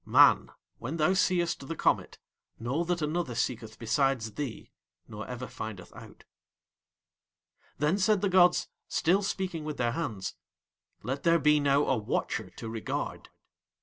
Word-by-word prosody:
Man, - - +6 0.3
when 140 +8 -4
thou 160 +4 +3
seest 175 -6 +1
the 165 - -4
comet, - - +1 0.4
know 130 +9 -1
that 175 -2 -1
another 150 -5 -1
seeketh 115 -2 -2
besides 120 -1 +1
thee 130 -3 -5 0.4
nor 110 -1 -7
ever 125 0 -5
findeth 110 -7 -7
out. - - -13 1.5
Then 150 +7 +1
said 205 0 +3
the 205 - +2
gods, 180 -1 +4 0.2
still 185 +5 +2
speaking 190 -5 -3
with 150 -1 -4
Their 120 -1 +1
hands: 110 - -3 0.7
"Let 135 +5 -3
there 170 0 +4
be 150 -2 +4
now 145 0 +3
a 135 - +2
Watcher 105 - -2
to 115 - -9
regard." 110 -1 -4
145 Hz, 145 wpm, -29 LUFS, 115-170 Hz, 1.5 s, Man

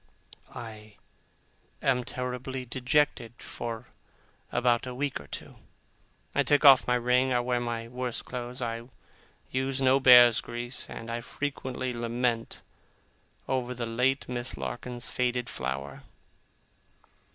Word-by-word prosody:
I 110 -2 -9 0.8
am 125 -2 +2
terribly 125 +1 -4
dejected 125 -1 +1
for 115 -1 -6 0.6
about 120 0 +2
a 125 - -5
week 140 +1 -2
or 70 - -12
two. - - -9 0.8
I - - +3
take 145 +1 +3
off 135 -2 +8
my 125 - +3
ring, 125 +2 +2
I 125 - +3
wear 125 0 0
my 115 -1 -3
worst 125 0 -4
clothes, 125 0 -5
I 115 +1 -4 0.6
use 130 +1 -1
no 135 0 +4
bear's 120 -3 +8
grease, 120 +1 -5
and 115 0 -7
I 120 0 -2
frequently 130 -1 -4
lament 120 0 -1 0.8
over 125 -1 -1
the 120 0 -3
late 125 +4 +1
Miss 125 0 -3
Larkins's 120 0 -4
faded 125 -1 -1
flower. 65 +2 -4
125 Hz, 125 wpm, -28 LUFS, 120-130 Hz, 0.8 s, off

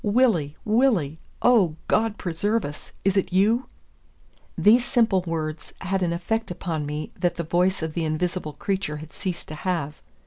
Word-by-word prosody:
"Willie, 205 - +2
Willie! 210 - +2 0.2
Oh, 205 -11 +5
God 220 -1 +2
preserve 205 +6 0
us! 145 +1 -8
is 195 0 +3
it 195 - +1
you?" 215 +7 +3 0.9
These 230 +4 +6
simple 225 -7 +2
words 155 -1 -3
had 190 +1 -1
an 175 -2 +1
effect 220 +7 -1
upon 165 -4 -3
me 150 +1 -4
that 175 - +1
the 170 - -2
voice 180 +2 +1
of 160 -1 -3
the 170 - -1
invisible 160 0 -2
creature 190 -5 -2
had 155 +1 -10
ceased 180 -3 -4
to - - -5
have. 155 -3 -3
180 Hz, 165 wpm, -25 LUFS, 155-210 Hz, 0.9 s, These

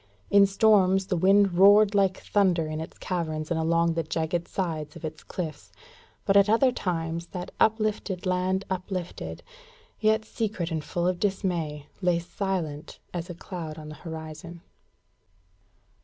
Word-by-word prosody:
In 200 0 +7
storms 195 -2 +4
the 185 - -1
wind 195 +2 +4
roared 200 +3 +6
like 195 -2 +2
thunder 185 -5 +1
in 155 0 -4
its 160 - -9
caverns 155 -4 -3
and 165 - +1
along 165 +1 +2
the 165 - 0
jagged 160 +2 -2
sides 155 -5 -3
of 165 - -7
its 155 -1 -6
cliffs, 165 -4 -6 0.5
but 195 - +2
at 200 +1 +6
other 240 +4 +4
times 170 -5 -3
that 180 0 -6
uplifted 215 -3 +1
land 185 +1 0
uplifted, 185 -1 -5 0.6
yet 220 0 +2
secret 205 -7 -3
and 160 -2 -2
full 175 +2 -2
of 180 -1 0
dismay 175 -7 -1 0.2
lay 180 -2 +3
silent 170 -4 -4 0.2
as 175 0 -4
a 175 - -6
cloud 165 -3 -7
on 155 -1 -8
the 155 - -8
horizon. 160 +1 -8
180 Hz, 150 wpm, -27 LUFS, 165-195 Hz, 0.6 s, In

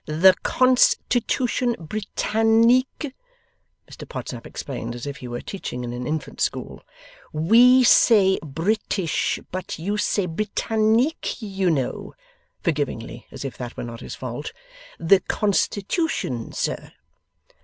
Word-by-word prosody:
'The 165 +5 +6
Constitution 250 -1 +2
Britannique,' 225 - +1 0.7
Mr - - -11
Podsnap - - -6
explained, 120 -3 -6
as 120 - -7
if 140 -1 -5
he 125 - -8
were 120 0 -5
teaching 125 -10 -6
in 120 0 -4
an 125 0 -5
infant 155 -1 -4
school. - - -2 0.5
'We 235 +11 +6
Say 205 -5 +5
British, 170 +3 -1
But 185 +1 -5
You 200 +6 -2
Say 205 -2 +1
Britannique, 220 - 0
You 195 -5 -1
Know' 135 -6 -2 0.5
(forgivingly, 135 - -3
as 135 0 -8
if 135 - -5
that 125 -1 -6
were - - -4
not 115 -1 -7
his - - -7
fault). 130 +3 -6 0.5
'The 185 +4 +5
Constitution, 205 - -1
Sir. - - -3
190 Hz, 120 wpm, -23 LUFS, 135-225 Hz, 0.7 s, The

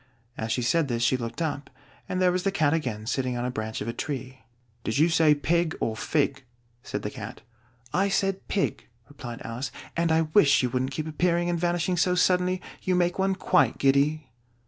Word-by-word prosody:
As 110 0 -3
she 125 - 0
said 160 +5 +2
this, 120 -2 -1
she 130 - +3
looked 120 +4 -3
up, 145 -3 -3 0.4
and 185 - -1
there 180 -1 +4
was 180 +1 0
the 195 - +1
Cat 155 -6 +2
again, 125 -10 -2
sitting 125 +1 -1
on 120 - -2
a 125 - -1
branch 110 -2 -4
of 105 - -4
a 115 - -2
tree. 130 -2 -5 0.4
"Did 110 - -1
you 160 +4 +4
say 160 -3 +5
pig, 160 +3 0
or 110 - -1
fig?" 140 +2 0 0.4
said - - -5
the - - -3
Cat. - - -8 0.5
"I 195 +2 +2
said 195 0 0
pig," 200 - -1 0.2
replied 120 -5 -8
Alice; 125 +4 -4 0.2
"and 170 -1 +1
I 160 0 +4
wish 145 -10 +5
you 125 - 0
wouldn't 130 +1 0
keep 150 +3 -4
appearing 175 +2 +1
and 170 - -1
vanishing 175 +1 0
so 180 +1 +2
suddenly: 180 0 +2 0.2
you 185 - +1
make 175 +1 +1
one 190 0 +2
quite 185 - +2
giddy." 140 +1 +2
155 Hz, 205 wpm, -26 LUFS, 130-175 Hz, 0.5 s, say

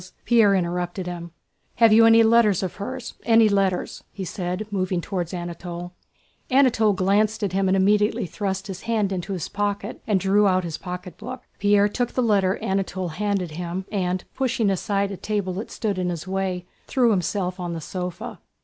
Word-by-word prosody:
Pierre 220 -4 +5
interrupted 175 0 -2
him. 175 -1 -6 0.5
"Have 230 -2 +6
you 225 +1 +7
any 225 0 +7
letters 220 -4 +4
of 185 - -4
hers? 250 +4 -5
Any 225 -1 +5
letters?" 195 -3 0
he 195 - -6
said, 180 +3 -3
moving 185 -2 0
toward 175 -1 -3
Anatole. 175 0 -6 0.6
Anatole 250 -6 +4
glanced 205 +3 +1
at 195 -3 -1
him 195 0 +1
and 190 +1 +3
immediately 205 +2 +2
thrust 190 +2 -3
his 195 -2 -7
hand 215 -4 +1
into 190 +1 -3
his 175 -4 -3
pocket 205 0 -3
and 205 -3 +2
drew 200 +2 +3
out 185 -1 +2
his 165 -3 -5
pocketbook. 180 +7 -7 0.2
Pierre 205 0 +4
took 245 +3 -2
the 255 - +1
letter 200 -4 +2
Anatole 190 -1 -1
handed 195 0 -2
him 175 +3 -4
and, 185 -2 -1
pushing 235 -6 +1
aside 200 +1 0
a 195 - -5
table 205 -3 -2
that 200 +5 -5
stood 205 -5 -2
in 180 -1 0
his 170 0 -5
way, 185 -1 -2 0.2
threw 245 -3 +3
himself 185 -1 -1
on 175 -1 -3
the 165 - -4
sofa. 180 +2 -6
195 Hz, 175 wpm, -24 LUFS, 180-210 Hz, 0.6 s, you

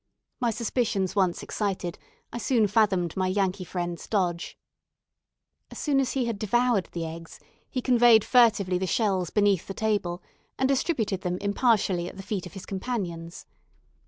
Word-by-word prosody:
My 245 -3 +1
suspicions 225 -4 -1
once 185 -4 +1
excited, 190 -4 -3 0.3
I 235 - -3
soon 235 -1 +2
fathomed 195 -5 +2
my 185 -1 0
Yankee 185 -1 0
friend's 175 -1 -4
dodge. 180 -5 -1 1.1
As - - -10
soon 285 -3 +1
as 265 -3 0
he 260 -3 0
had 230 -4 -3
devoured 240 -1 +1
the 170 -1 -4
eggs, 165 +1 -9 0.3
he 255 - -3
conveyed 240 -3 +6
furtively 210 -7 +4
the 190 - -1
shells 190 -5 +1
beneath 205 -4 +2
the 195 - -6
table, 200 -5 -1 0.3
and 265 - +2
distributed 255 - 0
them 180 -1 -2
impartially 200 -4 +1
at - - -13
the 195 - -7
feet 195 -2 -3
of - - -14
his 195 - -9
companions. 185 -6 -4
200 Hz, 160 wpm, -26 LUFS, 180-230 Hz, 1.1 s, conveyed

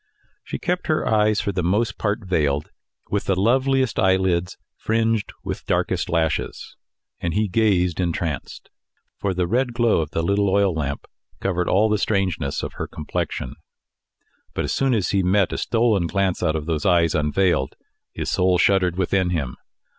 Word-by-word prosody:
She - - -5
kept 180 +1 -2
her 155 - +1
eyes 105 -1 +3
for 100 - -1
the 90 -1 -2
most 105 +6 0
part 105 0 -1
veiled 75 -6 0 0.4
with 100 - 0
the 95 -1 +1
loveliest 130 +3 +2
eyelids 95 -2 +1 0.2
fringed 115 -1 0
with - - -5
darkest - - 0
lashes, 80 -2 -1 0.4
and 85 0 -2
he 105 +1 +2
gazed 90 -4 +1
entranced; 85 -4 -3 0.5
for 95 -2 -1
the 90 0 +1
red 120 +6 0
glow 120 -4 +2
of 75 - -4
the 80 - -2
little 100 +3 +2
oil 100 -1 +3
lamp 70 -3 -3 0.3
covered 90 -2 -1
all 105 +4 +4
the 105 -1 +1
strangeness 90 -9 -1
of - - -4
her - - -3
complexion. 70 -3 -4 1.0
But - - -1
as - - -2
soon 135 -2 +2
as 100 -5 0
he 100 - +2
met 95 +1 +2
a - - -2
stolen 115 -6 +1
glance 95 0 0
out 80 - +1
of 75 -2 -3
those 80 -2 -2
eyes 85 -3 +3
unveiled, 75 -1 +1 0.4
his - - -4
soul 90 0 +3
shuddered 90 -1 +2
within 95 0 +1
him. 75 -8 -2
95 Hz, 170 wpm, -22 LUFS, 85-105 Hz, 1.0 s, all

